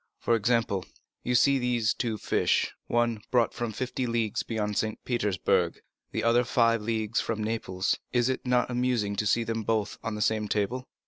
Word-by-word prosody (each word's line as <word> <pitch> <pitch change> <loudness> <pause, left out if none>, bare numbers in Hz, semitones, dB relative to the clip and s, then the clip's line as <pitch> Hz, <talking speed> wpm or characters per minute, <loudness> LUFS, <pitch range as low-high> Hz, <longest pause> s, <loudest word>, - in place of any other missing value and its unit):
For 115 - +1
example, 115 -3 +1 0.4
you 125 - 0
see 140 +2 +4
these 120 -3 +1
two 115 -3 -2
fish; - - +1
one 120 -2 +1
brought 120 -2 +2
from 120 -2 -3
fifty 125 +2 -3
leagues 115 -1 0
beyond 105 -2 -2
St. 110 +1 -1
Petersburg, 95 -6 +1 0.3
the - - -2
other 120 +1 +4
five 115 -2 +2
leagues 110 0 -1
from 110 -1 -2
Naples. 100 -4 -1
Is 120 -1 +2
it 130 - -1
not 125 0 +2
amusing 120 -5 0
to 105 - 0
see 115 +3 +2
them 115 0 -2
both 110 -1 -1
on 115 -2 -3
the 105 - -4
same 110 -1 +1
table?" 110 +6 -1
115 Hz, 180 wpm, -28 LUFS, 105-120 Hz, 0.4 s, see